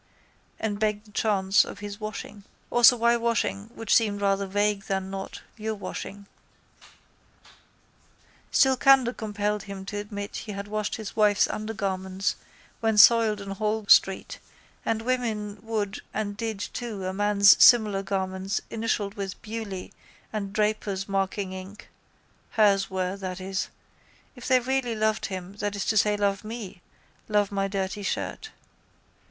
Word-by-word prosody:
and 205 -2 -2
begged 210 0 0
the 210 - -18
chance 200 -2 +3
of - - -8
his 205 0 -7
washing. 215 -1 -6 0.3
Also 240 0 +7
why 235 +1 +4
washing 230 -4 -1
which 225 - -1
seemed 210 -3 +2
rather 200 -1 +1
vague 205 +1 0
than 190 -1 -2
not, 195 0 -6 0.2
your 220 0 -3
washing. 200 0 -7 2.2
Still 265 -1 +4
candour 260 -2 +5
compelled 210 -2 -2
him 195 -1 -7
to 205 +1 -5
admit 205 0 -6
he 210 - -6
had 200 +1 -6
washed 210 0 -2
his 220 -2 -7
wife's 210 -2 +4
undergarments 195 -3 -2 0.4
when 220 -1 +1
soiled 220 -1 +7
in 200 -1 -7
Holles 215 +1 +4
street 190 0 +1 0.4
and 225 0 -1
women 220 -5 -2
would 215 -3 -3
and 205 -1 -2
did 220 0 -3
too 215 -2 -5
a 185 - -2
man's 205 0 +6
similar 220 -6 +6
garments 190 0 -2
initialled 220 -3 -1
with 195 -2 -5
Bewley 215 -4 -6 0.4
and 200 -2 -3
Draper's 210 -2 -1
marking 195 0 -1
ink 190 +4 -10 0.6
(hers 200 -3 +3
were, 185 0 -2
that 185 -1 -5
is) 190 +1 -3 0.7
if 245 - -9
they 255 -1 +5
really 250 -1 -1
loved 215 0 0
him, 190 0 -7
that 205 0 -2
is 200 - -3
to 220 - +1
say, 210 0 +3
love 200 0 0
me, 215 -5 -7 0.5
love 205 -1 +2
my 195 -1 0
dirty 195 0 -3
shirt. 440 - -3
205 Hz, 145 wpm, -26 LUFS, 195-220 Hz, 2.2 s, Also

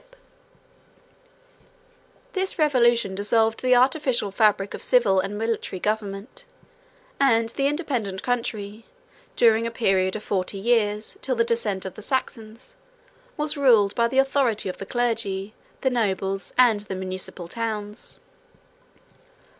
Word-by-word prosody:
] - - -34 1.5
This 380 0 -1
revolution 240 - +3
dissolved 220 +3 +1
the 255 -1 +4
artificial 255 -4 +2
fabric 205 -1 +2
of - - -7
civil 225 -7 +3
and 195 +2 -3
military 225 -4 -2
government; 205 +1 -3 0.8
and 230 -5 +3
the 275 +4 0
independent 250 - -2
country, 225 -3 -3 0.5
during 230 0 +4
a - - -2
period 190 -4 +1
of 215 - -5
forty 195 0 -2
years, 210 -1 0
till 260 - -1
the 230 - +3
descent 225 -5 -1
of 190 - -5
the - - -11
Saxons, 235 - -3 0.6
was 300 0 0
ruled 230 -8 +4
by 235 0 +2
the 260 +3 -3
authority 270 -7 +2
of 185 - -6
the 195 - -7
clergy, 220 -5 -1 0.3
the 265 - +1
nobles, 195 -4 -1
and 240 -4 +5
the 200 -2 -6
municipal 185 -2 -6
towns. 215 0 -4
225 Hz, 130 wpm, -24 LUFS, 200-245 Hz, 1.5 s, and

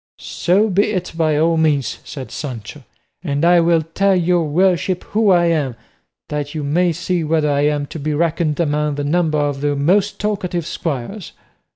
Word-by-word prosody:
"So 195 +6 0
be 200 +3 +3
it 185 -3 -3
by 155 -2 +1
all 165 +2 +2
means," 150 -6 +1
said 130 -6 -8
Sancho; 130 +1 -7 0.4
"and 145 -1 0
I 175 0 +6
will 165 -1 +3
tell 190 +5 +1
your 175 -1 +2
worship 180 +3 +1
who 215 -1 +1
I 175 -2 +4
am, 150 -7 0 0.5
that 145 0 -4
you 155 - -3
may 170 +5 +1
see 175 +1 -2
whether 155 -1 +1
I 145 +1 +2
am 145 -1 0
to 160 - -8
be 150 +1 -2
reckoned 165 -1 0
among 150 -2 0
the 145 - -3
number 155 +1 +1
of 145 -2 -1
the 145 0 0
most 190 +8 +1
talkative 185 -5 -2
squires." 160 - -5
160 Hz, 180 wpm, -19 LUFS, 145-175 Hz, 0.5 s, I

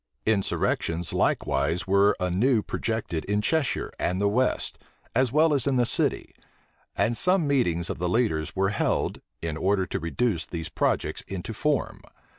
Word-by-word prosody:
Insurrections 90 -5 0
likewise 75 +7 +1
were 100 +1 +3
anew 105 +6 +2
projected 110 -8 -2
in 105 +1 0
Cheshire 140 +5 0
and 90 +2 0
the 100 - +2
west, 125 +5 0 0.3
as 125 0 +2
well 155 +2 +4
as 140 -1 +1
in 135 - +2
the 125 -1 +3
city; 115 - 0 0.6
and 105 +5 +2
some 185 +4 +2
meetings 90 - +1
of - - -4
the 90 0 0
leaders 90 -8 0
were 95 0 +2
held, - - -1 0.2
in 80 -2 -2
order 95 +2 +1
to - - -3
reduce 85 0 -1
these 80 -2 -5
projects - - 0
into 95 +3 -5
form. 150 +6 -1
100 Hz, 155 wpm, -26 LUFS, 85-125 Hz, 0.6 s, well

